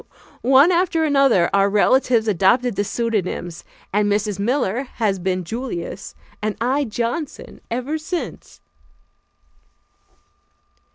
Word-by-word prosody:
One 270 +7 +5
after 340 -2 +1
another 275 - +3
our 200 0 +4
relatives 225 +2 +3
adopted 215 +5 +2
the 205 - 0
pseudonyms, 190 -7 -3 0.3
and 205 0 +2
Mrs. 205 -1 -1
Miller 245 0 0
has 205 -5 0
been 185 0 -1
"Julius" 195 -2 -6 0.3
and 215 0 -2
I 265 +5 +1
"Johnson" 240 +6 -4
ever 255 +7 -2
since. 345 +2 -6
230 Hz, 105 wpm, -21 LUFS, 200-265 Hz, 0.3 s, One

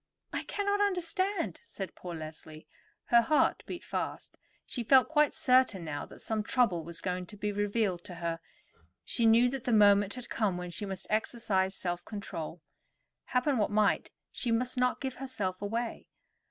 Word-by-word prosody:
"I - - -1
cannot 405 0 0
understand," 375 0 0
said 195 - -6
poor 175 -2 -7
Leslie. 155 0 -8 0.5
Her 235 - +9
heart 300 +6 +2
beat 350 - -6
fast. - - -4 0.3
She 245 - -4
felt 260 +3 +6
quite 300 -1 +3
certain 255 -9 +3
now 145 -2 -4
that - - -13
some 220 -1 0
trouble 210 -7 +2
was 165 +1 -7
going 180 -1 -2
to 210 - -11
be 210 +1 -1
revealed 205 -3 0
to 185 -3 -8
her; 165 -1 -3 0.7
she 230 -2 +2
knew 230 +2 +6
that 265 0 -5
the 250 - +1
moment 205 -2 +5
had 250 -1 -7
come 205 -5 0
when 180 0 -5
she 205 +4 -5
must 190 -1 -5
exercise 205 -3 0
self 175 -1 -3
control. 170 -6 -6 0.6
Happen 250 0 +1
what 210 - +2
might, 210 -1 +2 0.2
she 240 - -2
must 245 +2 0
not 250 0 +1
give 265 -2 -3
herself 205 -9 -3
away. 225 +3 -3
210 Hz, 170 wpm, -31 LUFS, 185-250 Hz, 0.7 s, Her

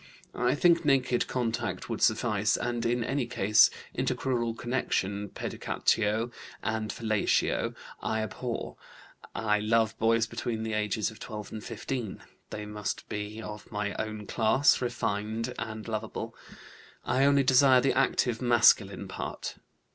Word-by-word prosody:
I 125 +2 +1
think 170 +2 +4
naked 135 -4 +2
contact 120 -3 -2
would 115 -2 -4
suffice, 110 -1 +2
and 120 -1 -1
in 120 0 +1
any 130 +1 -1
case 105 -2 +5 0.3
intercrural 120 -3 -1
connection. 105 -5 -1
Pedicatio 110 +4 0 0.3
and 110 -1 -1
fellatio 110 -3 0 0.3
I 110 0 -1
abhor. 120 +2 -5 0.6
I 105 -2 +1
love 110 +1 +2
boys 115 0 +3
between 110 -1 -3
the 110 -1 -3
ages 105 0 0
of 110 - -14
12 105 -2 -7
and 110 -2 -6
15; 115 -1 -5 0.3
they 105 - -5
must 105 -1 -4
be 105 +2 -5
of 105 -1 -8
my 105 0 -2
own 110 -1 -4
class, 120 +7 +3
refined, 115 -1 -2
and 110 -1 -5
lovable. 110 0 -4 0.7
I 130 - +2
only 140 0 +5
desire 130 0 +6
the 135 - +2
active 130 -3 +1
masculine 120 -4 +4
part. - - -6
115 Hz, 130 wpm, -29 LUFS, 105-120 Hz, 0.7 s, desire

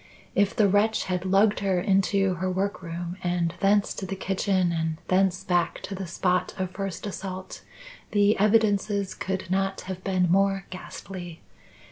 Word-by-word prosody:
If 200 0 +2
the 210 - +4
wretch 205 +3 +2
had 180 0 -2
lugged 200 +3 +3
her 195 -2 +1
into 195 0 +2
her 185 +2 -2
workroom 175 -2 -3
and 175 -1 0
thence 200 +1 +3
to 190 - -6
the 195 - -3
kitchen, 190 -1 0
and 160 -1 -1
thence 185 -1 +2
back 175 -2 +1
to 200 - -5
the 190 -1 -5
spot 180 +1 0
of 185 -1 -2
first 195 -1 -5
assault, 190 -2 -6 0.5
the 205 +1 +4
evidences 205 -2 +2
could 190 -1 -4
not 195 0 0
have 185 0 -7
been 185 -3 +1
more 195 0 +2
ghastly. 185 -2 -8
190 Hz, 155 wpm, -26 LUFS, 180-200 Hz, 0.5 s, the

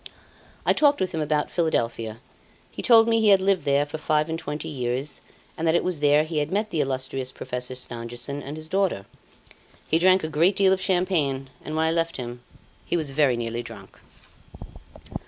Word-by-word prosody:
I - - +4
talked 290 -1 +3
with 185 -1 -1
him 160 - -2
about 150 0 0
Philadelphia; 115 -8 -1 0.5
he - - -6
told 225 -2 +6
me 225 -1 +3
he 215 - +4
had 195 -1 +7
lived 190 -4 +1
there 140 0 +2
for 150 +2 -7
five 155 +1 +1
and 160 0 -3
twenty 150 -2 -5
years, 130 0 -3 0.3
and 165 - -2
that 160 - +3
it - - +2
was 180 -4 -1
there 145 +1 +4
he 155 -1 -2
had 145 - -1
met 210 +3 -1
the 160 - 0
illustrious 130 -1 -3
Professor 125 0 -5
Stangerson 120 +3 -5
and 145 +3 -7
his 155 0 -6
daughter. 185 - 0 0.9
He 160 - +4
drank 185 +1 +4
a - - -1
great 165 +5 +2
deal 190 -1 +4
of 190 - -1
champagne, 155 -8 0
and 155 - -5
when 160 0 +1
I 160 - +2
left 165 0 -1
him 120 -1 -6 0.4
he - - -1
was 155 -4 -2
very 135 -4 +2
nearly 115 0 -3
drunk. - - -12
155 Hz, 195 wpm, -24 LUFS, 130-175 Hz, 0.9 s, had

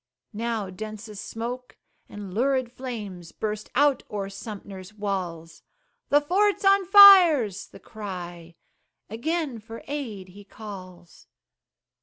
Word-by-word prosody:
Now 220 -3 -3
densest 215 +1 -8
smoke 245 +2 -6 0.3
and 205 -3 -9
lurid 255 +2 0
flames 210 -10 -7
Burst 210 -1 -5
out 285 +1 +3
o'er 200 -2 -4
Sumter's 200 -1 -9
walls; 180 -5 -5 0.5
"The 290 - +5
fort's 390 +6 +1
on 395 0 +5
fire," 380 - +9
's 195 - -9
the - - -15
cry; 175 -5 -8 0.6
Again 285 +1 -2
for 225 +1 -11
aid 230 -10 -5
he 200 +3 -14
calls. 185 -4 -12
215 Hz, 115 wpm, -25 LUFS, 195-260 Hz, 0.6 s, fire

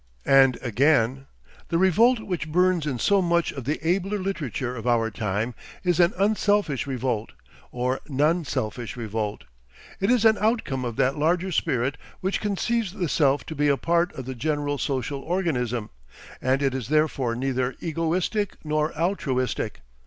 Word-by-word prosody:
And 135 -2 +5
again: 135 +1 +2 0.4
"The 165 - 0
revolt 220 +7 +4
which 175 -6 -4
burns 180 -2 +2
in 135 -4 -1
so 200 - +3
much 170 -1 +1
of 135 -4 -7
the 150 +4 -1
abler 195 +4 +1
literature 145 - -3
of 115 0 -6
our 115 -2 +2
time 105 +3 -2 0.3
is 180 -1 +1
an 175 0 +5
unselfish 205 - +1
revolt, 125 -4 -2 0.4
or 125 +1 -1
non 150 +5 +2
selfish 120 -3 -4
revolt: 110 -2 -3 0.6
it 195 - +1
is 245 -3 +3
an 220 -1 +5
outcome 210 - 0
of 120 -2 -4
that 135 +3 +1
larger 175 +5 +1
spirit 130 -3 0 0.2
which 190 +2 -1
conceives 210 0 -1
the 180 -4 -2
self 145 -2 +2
to - - -6
be 145 -1 +1
a 140 -1 +3
part 170 +3 +1
of 130 - -7
the 130 - -4
general 145 +1 -1
social 135 +1 -2
organism, 130 - -1 0.5
and 130 +2 +1
it 135 -1 +1
is 130 -4 -4
therefore 140 -5 +1
neither 130 0 -1
egoistic 170 +5 -1
nor 155 0 0
altruistic. 140 - -1
145 Hz, 160 wpm, -25 LUFS, 130-180 Hz, 0.6 s, And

